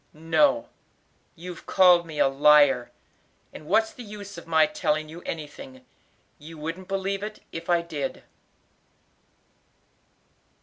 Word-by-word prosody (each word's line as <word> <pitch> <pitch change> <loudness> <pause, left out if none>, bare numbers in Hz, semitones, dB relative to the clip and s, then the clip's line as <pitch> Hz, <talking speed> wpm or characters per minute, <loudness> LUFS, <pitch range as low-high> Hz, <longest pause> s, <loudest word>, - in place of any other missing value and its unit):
"No, 165 - +2 0.7
you've 175 0 -10
called 180 -2 +5
me 155 -2 -8
a - - +4
liar, 135 -3 +4 0.6
and 150 - -11
what's 220 +5 +2
the - - -11
use 205 -3 -9
of - - -11
my 160 -1 +4
telling 155 0 -2
you 165 +2 -10
anything? 145 -5 -8 0.5
you 160 +2 -11
wouldn't 165 +5 -6
believe 195 0 -2
it 210 +1 -7
if 165 +1 -8
I 170 -1 +3
did." 155 -5 -5
165 Hz, 125 wpm, -25 LUFS, 150-190 Hz, 0.7 s, called